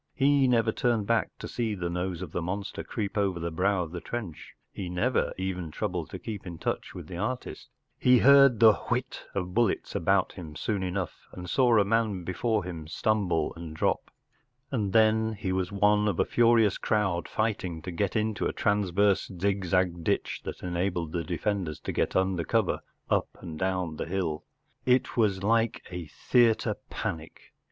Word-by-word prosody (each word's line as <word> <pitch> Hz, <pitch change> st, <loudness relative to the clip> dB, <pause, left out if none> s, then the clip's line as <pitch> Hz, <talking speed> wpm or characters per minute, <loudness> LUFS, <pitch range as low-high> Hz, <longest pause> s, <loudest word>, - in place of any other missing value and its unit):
He 140 Hz, -1 st, +4 dB
never 115 Hz, -3 st, +3 dB
turned 115 Hz, -3 st, 0 dB
back 115 Hz, -1 st, +1 dB
to -, -, -7 dB
see 115 Hz, -3 st, -2 dB
the 90 Hz, -3 st, -3 dB
nose 90 Hz, +1 st, -3 dB
of 85 Hz, -, -8 dB
the 85 Hz, -, -2 dB
monster 95 Hz, +4 st, -4 dB
creep 105 Hz, -2 st, -3 dB
over 95 Hz, -4 st, 0 dB
the 85 Hz, 0 st, -3 dB
brow 95 Hz, +2 st, +1 dB
of 80 Hz, -, -8 dB
the 90 Hz, -1 st, -5 dB
trench; 105 Hz, -10 st, -6 dB, 0.2 s
he 95 Hz, -3 st, -5 dB
never 90 Hz, +9 st, +1 dB
even 90 Hz, -3 st, -3 dB
troubled -, -, -3 dB
to -, -, -6 dB
keep 105 Hz, -4 st, -7 dB
in 85 Hz, -1 st, -6 dB
touch -, -, -3 dB
with -, -, -7 dB
the 90 Hz, -, -7 dB
artist 125 Hz, +7 st, -4 dB, 0.3 s
He 125 Hz, 0 st, +6 dB
heard 140 Hz, -1 st, +7 dB
the 110 Hz, -2 st, +8 dB
“ -, -, -10 dB
whitof 100 Hz, -7 st, -3 dB
bullets 115 Hz, -2 st, +1 dB
about -, -, +2 dB
him 80 Hz, -4 st, -9 dB
soon 100 Hz, +3 st, -2 dB
enough, 95 Hz, -1 st, -4 dB
and 90 Hz, 0 st, -7 dB
saw 120 Hz, +3 st, +4 dB
a 100 Hz, -, +4 dB
man 105 Hz, -3 st, +1 dB
before 105 Hz, +4 st, 0 dB
him 85 Hz, -4 st, -7 dB
stumble 90 Hz, -3 st, 0 dB
and 80 Hz, -2 st, -8 dB
drop, -, -, 0 dB, 0.6 s
and 105 Hz, -7 st, -1 dB
then 110 Hz, +1 st, +3 dB
he 95 Hz, -3 st, -3 dB
was 95 Hz, 0 st, -1 dB
one 105 Hz, +1 st, +3 dB
of 100 Hz, -5 st, -1 dB
a -, -, +4 dB
furious 115 Hz, -3 st, +3 dB
crowd 95 Hz, -5 st, 0 dB
fighting 100 Hz, -6 st, -2 dB
to 90 Hz, -, -5 dB
get 90 Hz, +3 st, -1 dB
into 110 Hz, -1 st, 0 dB
a -, -, -3 dB
transverse 100 Hz, -1 st, +2 dB
zigzag 90 Hz, -3 st, +1 dB
ditch -, -, -1 dB
that -, -, -6 dB
enabled 85 Hz, -2 st, -1 dB
the 85 Hz, -1 st, -2 dB
defenders 90 Hz, -2 st, -2 dB
to -, -, -3 dB
get -, -, -1 dB
under 95 Hz, -2 st, +1 dB
cover -, -, +1 dB, 0.3 s
up -, -, +2 dB
and 80 Hz, -4 st, -8 dB
down 90 Hz, -4 st, -1 dB
the -, -, -4 dB
hill 85 Hz, -4 st, -2 dB, 0.4 s
It 125 Hz, 0 st, +2 dB
was 100 Hz, -5 st, +1 dB
like 115 Hz, +1 st, +1 dB
a 90 Hz, -3 st, -5 dB
theatre 115 Hz, -, +2 dB
panic. 80 Hz, -1 st, -6 dB
95 Hz, 180 wpm, -28 LUFS, 90-110 Hz, 0.6 s, the